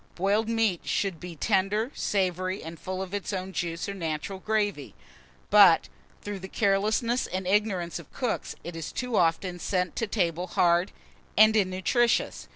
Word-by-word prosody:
Boiled 205 +5 +1
meat 225 -6 +1
should 195 -5 -1
be 175 0 -8
tender, 205 - +1
savoury, 185 -1 -1
and 165 +1 -8
full 185 0 -4
of 190 0 -9
its 205 -1 -3
own 190 -1 -4
juice, 170 +1 -3
or 200 - -3
natural 165 +1 -4
gravy; 205 -8 -1 0.6
but, 200 -5 +7 0.3
through 205 -1 -5
the 190 - -7
carelessness 215 +5 +1
and 185 0 -4
ignorance 185 -3 0
of 165 - -14
cooks, 250 -4 -3
it 175 0 -7
is 165 -2 -5
too 250 -2 -3
often 175 +1 +1
sent 180 -1 -1
to 225 - -1
table 180 -4 -1
hard, 175 +1 +3
tasteless, - - -22 0.4
and 215 +1 +7
innutritious. 200 +4 +1
190 Hz, 165 wpm, -27 LUFS, 175-210 Hz, 0.6 s, but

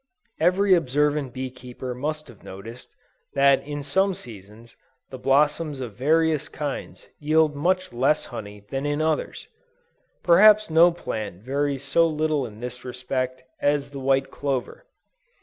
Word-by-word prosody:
Every 185 +4 +4
observant 150 -3 +1
bee 130 0 -5
keeper 125 0 -7
must 150 +4 -4
have 120 -5 -16
noticed, 115 +6 -10 0.4
that 140 0 +5
in 145 0 -6
some 190 +7 +1
seasons, 110 - -13 0.4
the 130 - -7
blossoms 145 +2 +1
of 120 -5 -6
various 155 +5 +1
kinds 145 -3 -6
yield 155 0 +2
much 185 +1 0
less 135 +5 +2
honey 105 -4 -9
than 135 +2 -2
in 145 0 -1
others. 155 -1 -2 0.8
Perhaps 210 +3 +6
no 170 +2 +6
plant 110 - -6
varies 140 +1 -1
so 165 +4 +3
little 155 -4 0
in 110 0 -13
this 125 0 -6
respect, 130 0 -4 0.2
as 145 -1 +1
the 140 - -7
white 135 0 +1
clover. 140 - -4
140 Hz, 140 wpm, -24 LUFS, 125-155 Hz, 0.8 s, Perhaps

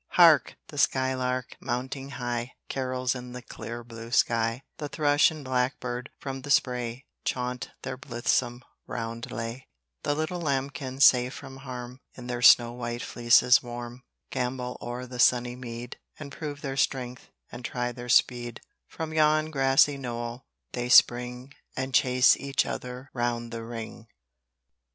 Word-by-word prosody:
Hark! - - +6
the - - -6
sky 130 0 +2
lark, 125 -1 -2
mounting 130 +3 -4
high, 120 0 -3 0.2
Carols 130 -1 -1
in 125 -1 -8
the 125 - -7
clear 120 +1 -7
blue 115 0 -9
sky; 115 0 +2
The 150 - -5
thrush 145 -1 +4
and 155 -3 -9
blackbird 125 0 -1
from 135 -1 -6
the 145 - -9
spray, 125 -2 +1 0.2
Chaunt 125 0 -2
their 130 0 -4
blithesome 120 0 -1 0.2
roundelay; 115 +1 -5 0.3
The 145 - 0
little 155 +3 -2
lambkins, 140 -2 +1
safe 125 +1 +5
from 135 - -9
harm, 125 -1 -8
In 125 - -9
their 120 -1 -3
snow 120 -1 +7
white 120 0 -4
fleeces 120 +1 +5
warm, 120 0 -7 0.3
Gambol 125 -1 -2
o'er 120 +1 -5
the 125 -1 -9
sunny 125 -1 +4
mead, 120 -1 -7 0.2
And 145 -2 -8
prove 145 -2 -6
their 135 -2 -4
strength, 125 -2 -1 0.2
and 120 - -8
try 125 0 -2
their 120 0 -8
speed: 120 -1 +2 0.3
From 160 -1 -5
yon 155 0 +3
grassy 135 0 +4
knoll 120 -1 -5 0.2
they 120 0 -3
spring, 125 +2 +4 0.2
And 130 0 -3
chase 125 -1 +5
each 140 0 0
other 125 +2 -6
round 120 -1 -2
the 115 -1 -5
ring. 115 0 -7
125 Hz, 145 wpm, -27 LUFS, 120-135 Hz, 0.3 s, snow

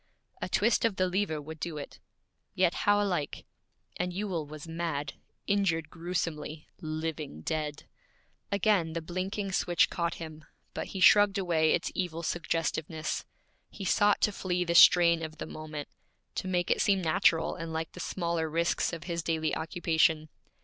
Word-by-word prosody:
A - - -3
twist 230 +3 +2
of 225 -4 +2
the 185 - +2
lever 180 -4 0
would 160 +2 -9
do 165 -2 -4
it. 145 - -8 0.6
Yet 180 -2 +3 0.2
how 205 0 +5
alike 180 -8 -1 0.5
And 180 +1 -1
Ewell 180 -5 -3
was 155 +2 -9
mad, 160 -4 -3 0.3
injured 170 -6 +1
gruesomely, 165 -3 -4
living 155 - -4
dead. 150 - -3 0.7
Again 200 -5 +2
the 165 - -2
blinking 190 +4 -3
switch 175 -2 +2
caught 170 0 -1
him, 155 -2 -8 0.3
but - - -4
he 190 - -6
shrugged 205 +1 +7
away 165 -5 +2
its 175 - -3
evil 170 -2 -3
suggestiveness. 160 -1 -2 0.4
He 200 - -7
sought 205 +2 +3
to 210 - +3
flee 180 -2 -1
the 170 -1 -1
strain 170 -1 +7
of 155 -1 -6
the - - -5
moment, 155 -2 -7 0.5
to - - -3
make 180 -1 0
it - - +2
seem 195 -2 +2
natural 165 0 +3
and 165 -2 -6
like 160 0 -3
the - - -11
smaller 170 -3 -1
risks 170 +2 0
of 165 -2 -5
his 170 -1 -3
daily 160 -1 0
occupation. 160 -1 +1
170 Hz, 160 wpm, -30 LUFS, 160-185 Hz, 0.7 s, shrugged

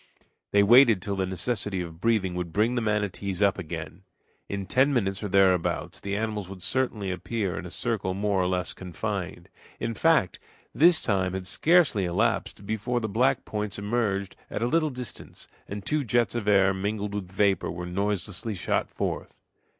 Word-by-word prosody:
They 100 0 +4
waited 115 -1 +7
till 100 +2 -3
the 95 -1 -1
necessity 100 0 -2
of 85 -1 -8
breathing 110 -6 +1
would 90 -1 -4
bring 110 +7 +2
the 125 - 0
manatees 100 -3 -1
up 100 0 +3
again. 80 0 -6 0.5
In 100 -1 -3
ten 130 +7 +3
minutes 95 -7 0
or 105 - -2
thereabouts 95 -3 +2
the 100 0 -3
animals 105 -3 -3
would 95 -2 -9
certainly 110 -7 0
appear 95 +1 -2
in 90 - -5
a - - -8
circle 100 -3 -1
more 100 -1 +1
or 90 - +1
less 90 -1 -1
confined. 90 -3 -5 0.3
In 115 0 -2
fact, 155 - +2 0.3
this 170 +1 +5
time 95 -4 0
had 95 -1 -4
scarcely 150 - +3
elapsed 90 +3 -1
before 110 +4 -1
the 110 - -2
black 125 +5 +1
points 105 -1 -3
emerged 100 -2 -1
at 115 - -3
a - - +2
little 155 +4 +2
distance, 125 -4 -8 0.2
and 100 0 -6
two 150 -1 0
jets 120 -1 +1
of 120 -3 -3
air 95 -2 +5
mingled 100 +1 -3
with 95 -3 -5
vapor 100 0 +1
were 90 +1 -5
noiselessly 100 +3 -2
shot 85 - -1
forth. - - -4
100 Hz, 175 wpm, -27 LUFS, 95-115 Hz, 0.5 s, waited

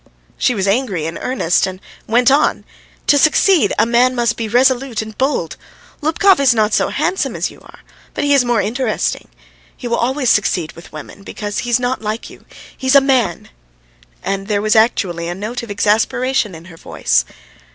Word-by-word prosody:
She 250 - +1
was 195 -1 -1
angry 200 - 0
in 165 +1 -5
earnest, 185 -11 0
and 185 0 -7 0.3
went 245 +4 +3
on: 285 +2 +1 0.4
"To 285 - +4
succeed, 310 - +3
a - - +4
man 245 +2 +2
must 235 -1 0
be 230 - -4
resolute 250 0 +1
and 220 0 -11
bold. 260 - -1 0.4
Lubkov 325 +4 +3
is 265 -4 +4
not 215 -1 +1
so - - +2
handsome 380 - -1
as - - -2
you - - -16
are, - - -17 0.3
but - - -2
he 285 0 +3
is 275 -3 +4
more 240 -3 +1
interesting. 235 +1 -2 0.5
He 245 - -6
will 235 - 0
always 255 +1 +1
succeed 175 -5 0
with 170 - -14
women 155 +6 -10
because 205 +1 -5
he's 240 0 0
not 250 0 -2
like 215 +1 -5
you; - - -16 0.3
he's 260 +1 +1
a - - +10
man... 255 -10 0 0.4
." - - -32
And 195 0 -3
there 210 -2 0
was 215 +1 +1
actually 185 -7 +1
a 175 - -4
note 215 +6 -5
of 235 - -10
exasperation 215 +1 0
in 165 +1 -12
her 170 -2 -14
voice. - - 0
230 Hz, 190 wpm, -17 LUFS, 195-260 Hz, 0.5 s, a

